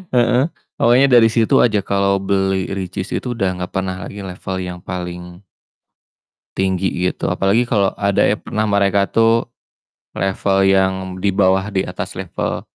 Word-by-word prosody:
heeh 125 +2 +3 0.3
pokoknya 125 +4 +4
dari 120 -3 +6
situ 115 -1 +2
aja 110 -4 +3
kalau 100 0 +1
beli 95 -1 0
Richeese 95 0 -4
itu 125 - -4
udah 95 - +1 0.2
gak 90 - -7
pernah 95 -1 -2
lagi 105 - -8
level 95 +1 -6
yang 90 -1 -6
paling 90 +1 -7 1.1
tinggi 95 0 0 0.2
gitu, 90 - -1
apalagi 110 +5 +1
kalau 100 -4 +2
ada 100 -1 +2
ya - - +1
pernah 110 - -3
mereka 100 -1 +1
tuh, 115 +1 +2 0.7
level 95 +1 +1
yang 95 0 +3 0.3
di 100 - +2
bawah 95 +1 +2
di 95 - 0
atas - - -5
level - - -4
95 Hz, 150 wpm, -18 LUFS, 95-110 Hz, 1.1 s, dari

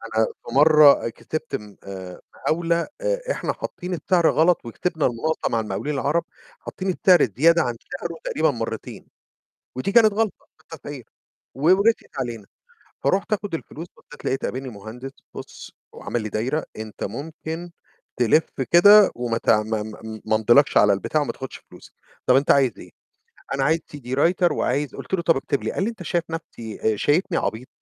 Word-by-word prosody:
أنا 110 0 +4
في 120 - -9
مَرَة 150 -3 +6
كتبت 155 +6 -5
م 105 -1 -8
آآ 95 -2 -8
مقاولة، 170 +1 0
آآ، - - 0
إحنا - - -2
حاطين 180 +1 -6
السعر 175 -1 +2
غلط 165 0 +2
وكسبنا 160 +7 -2
المناقصة 130 +7 -1
مع 115 - 0
المقاولين 125 +7 -3
العرب 145 +4 0 0.4
حاطين 190 0 -5
السعر 180 -3 +4
زيادة 165 +4 +5
عن 120 -1 -2 0.2
سعره 170 -1 -5
تقريبًا 155 -1 +1
مرتين، 115 -3 -6 0.7
ودي 165 +10 -2
كانت 220 -2 +6
غلطة 215 0 -2
في - - -27
التسعير 145 -3 -9 0.5
و 135 - -9
ورسيت 200 -5 +2
علينا. 115 -5 -4 0.6
فرُحت 195 +2 +1
آخد 205 -3 -3
الفلوس، 165 +1 -8
بصّيت 150 - -15
لقيت 135 - -1
قابلني 130 +1 -4
مهندس: 115 +5 -9 0.2
"بُص" - - -10 0.2
وعمل 120 - -4
لي 110 - -4
دايرة: 125 +9 -2
"أنت 110 -1 -7
ممكن 160 - -6 0.5
تلف 125 +6 +3 0.2
كده 205 +4 +8
وم 120 -1 -2
تعم 110 -1 +2 0.6
ما 110 - +2
امضيلكش 120 +6 +4
على 105 - +6
البتاع 100 +10 -1
وما 145 - -1
تاخدش 130 -1 -8
فلوس"، - - -15 0.3
"طب 125 - +5
أنت 140 +2 +4
عايز 135 -3 +4
إيه؟"، - - -12 0.6
"أنا 135 - 0
عايز 160 +4 +2 0.2
CD 130 -4 -12
writer 175 +4 +3
وعايز"، 145 -1 -1
قُلت - - -5
له: 180 - 0
"طَب 165 0 +3
اكتب 135 +1 -2
لي"، - - -2
قال 190 - -1
لي: 230 - 0
"أنت 225 - -10
شايف 170 -1 -1
نَفْسي 115 -9 -3
آآ - - -3
شايفني 165 - +1
عبيط؟ 115 +4 -3
145 Hz, 170 wpm, -23 LUFS, 120-170 Hz, 0.7 s, كده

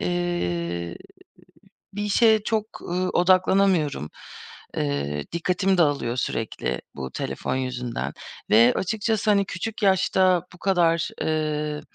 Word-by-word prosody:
eee, 85 - -2 1.0
bir 205 - -3
işe 220 +1 +4
çok, 220 -1 -2
ııı, 180 +1 -1
odaklanamıyorum. 185 - +2 0.7
Eee, 70 0 -2
dikkatim 180 +2 +1
dağılıyor 145 -7 +1
sürekli 115 -3 -2
bu 65 0 -6
telefon - - -3
yüzünden. 125 -2 -3 0.4
Ve 115 +3 +6
açıkçası, 220 +2 0
hani, 200 -1 +4
küçük 215 +5 -5
yaşta 190 -2 +3
bu 180 - -15
kadar, 170 -4 +2
eee, 150 -1 -1
175 Hz, 105 wpm, -24 LUFS, 125-195 Hz, 1.0 s, Ve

